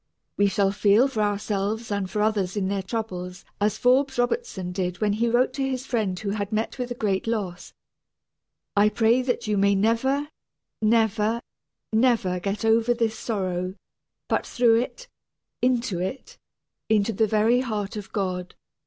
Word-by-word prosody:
We 205 - +3
shall 195 0 +2
feel 205 +5 +4
for 230 -6 -2
ourselves 205 +2 -1
and 200 -2 -1
for 210 +1 0
others 210 -3 0
in 190 -2 0
their 200 -1 -1
troubles 185 -4 -5
as 210 0 +1
Forbes 265 +3 +3
Robertson 245 - -1
did 180 -1 -3
when 210 -2 +1
he 230 +3 +1
wrote 250 +2 +2
to 270 0 -1
his 260 0 -3
friend 215 -8 -1
who 200 -2 -3
had 205 0 -3
met 220 +4 -2
with 250 0 -2
a 245 - -4
great 205 -3 -1
loss: 200 -6 -3 1.0
"I 205 +1 +5
pray 230 +3 +3
that 245 -2 -1
you 210 -1 0
may 200 0 +4
never, 265 +8 +1 0.5
never, 220 +1 +2 0.5
never 220 -6 +2
get 200 +3 -3
over 225 +2 +3
this 225 -2 0
sorrow, 185 -4 -2 0.5
but - - +1
through 235 -2 +4
it, - - -7 0.5
into 245 -7 +1
it, 260 - -5 0.5
into 220 0 +2
the 220 +2 +2
very 220 +4 +3
heart 215 -6 -3
of 210 -2 -7
God." 185 -3 -3
215 Hz, 160 wpm, -25 LUFS, 200-235 Hz, 1.0 s, I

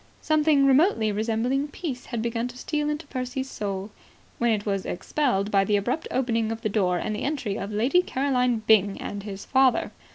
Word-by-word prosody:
Something 305 -2 +3
remotely 270 - +4
resembling 230 +6 0
peace 285 -5 -6
had 235 -3 -3
begun 235 0 -1
to 250 0 -10
steal 300 +2 -2
into 300 +1 -3
Percy's 260 0 -4
soul, 200 0 -4 0.5
when 235 - +2
it 210 -2 -1
was 195 -2 -1
expelled 210 -2 -1
by 195 -1 +4
the 210 +1 +1
abrupt 245 +11 -2
opening 230 -4 0
of 225 0 -5
the 215 - -1
door 185 -4 +1
and 215 +4 -2
the - - -5
entry 270 -9 -2
of 200 +1 -5
Lady 245 +12 +3
Caroline 250 -7 0
Byng 205 -3 +4
and 205 - -5
his 200 -1 -7
father. 260 -3 +3
235 Hz, 190 wpm, -25 LUFS, 210-275 Hz, 0.5 s, remotely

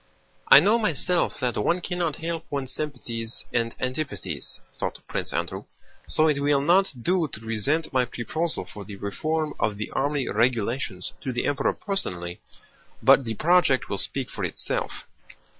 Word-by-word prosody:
"I - - +11
know 210 +9 +4
myself 180 -3 +1
that 125 -2 0
one 175 +9 +2
cannot 175 -3 -1
help 165 0 -4
one's 140 -3 -3
sympathies 120 -6 -3
and 115 -1 0
antipathies," 130 - -3
thought - - -3
Prince - - -2
Andrew, - - -3 0.4
"so 155 - +3
it 150 -2 +2
will 145 0 +3
not 180 +5 +4
do 180 0 +2
to 110 - -8
present 115 +9 -1
my 130 -1 +3
proposal 155 +8 -2
for 105 - -9
the 100 +1 -8
reform 155 +11 -2
of 105 -1 0
the 105 - -4
army 140 -1 0
regulations 115 -3 0
to 130 - -2
the 120 - -1
Emperor 145 -1 +1
personally, 90 - -3 0.6
but 135 - +7
the 110 -1 -3
project 165 -2 +3
will 100 - -1
speak 135 -3 -1
for - - -5
itself." - - -2
140 Hz, 160 wpm, -26 LUFS, 115-160 Hz, 0.6 s, I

